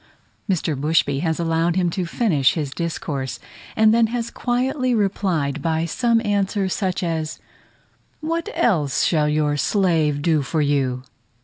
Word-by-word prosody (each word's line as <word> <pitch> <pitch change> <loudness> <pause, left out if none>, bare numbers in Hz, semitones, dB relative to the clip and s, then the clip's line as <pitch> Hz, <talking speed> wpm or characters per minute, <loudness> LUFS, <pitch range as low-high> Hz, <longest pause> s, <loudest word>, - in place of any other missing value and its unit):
Mr. 165 -4 0
Bushby 145 -1 +1
has 160 +1 -1
allowed 165 0 +1
him 180 -2 +1
to 180 0 -2
finish 165 - +2
his 150 -5 -3
discourse, 145 -5 -4 0.4
and 220 0 +5
then 230 -1 +4
has 235 0 -3
quietly 255 +1 0
replied 180 -9 0
by 160 +1 0
some 230 +7 +1
answer 200 -1 0
such 185 -1 -2
as, 160 -2 -2 0.8
"What 330 +2 -2
else 175 - +1
shall 150 -3 +2
your 150 -1 +1
slave 160 -6 +1
do 160 -2 +2
for 155 +3 -2
you?" 135 -4 0
170 Hz, 140 wpm, -21 LUFS, 150-205 Hz, 0.8 s, and